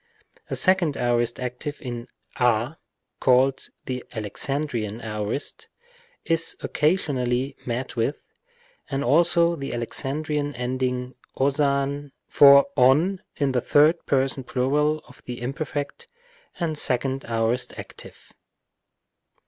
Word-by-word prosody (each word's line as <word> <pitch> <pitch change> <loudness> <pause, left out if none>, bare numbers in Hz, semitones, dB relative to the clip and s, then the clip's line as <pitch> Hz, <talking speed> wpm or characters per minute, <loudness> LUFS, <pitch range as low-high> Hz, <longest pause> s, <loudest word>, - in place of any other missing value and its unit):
A - - -1
second 185 -6 +2
aorist 120 -1 0
active 125 +4 -5
in 120 -3 -6 0.3
a 125 +4 +1 0.4
(called 130 +1 +3 0.2
the 125 -1 -4
Alexan 130 +7 -2
drian 115 -6 -4
aorist) 105 +4 -3 0.6
is 165 0 0
occasionally 135 -5 0
met 125 +2 -3
with, 120 +5 -1 0.7
and 140 -1 -1
also 170 +4 +4
the 135 -5 -5
Alexandrian 145 +4 -2
ending 125 0 -2 0.2
οσαν 140 0 0
for 140 -1 +8
ov 150 +9 +4 0.2
in 140 -3 0
the 125 -1 +1
third 150 +6 +4
person 135 -1 +1
plural 150 +5 0
of - - -17
the 125 -1 -6
imperfect 145 - -4 0.5
and 160 -4 -1
second 130 +2 0
aorist 115 +1 0
active. - - -10
135 Hz, 110 wpm, -24 LUFS, 125-150 Hz, 0.7 s, for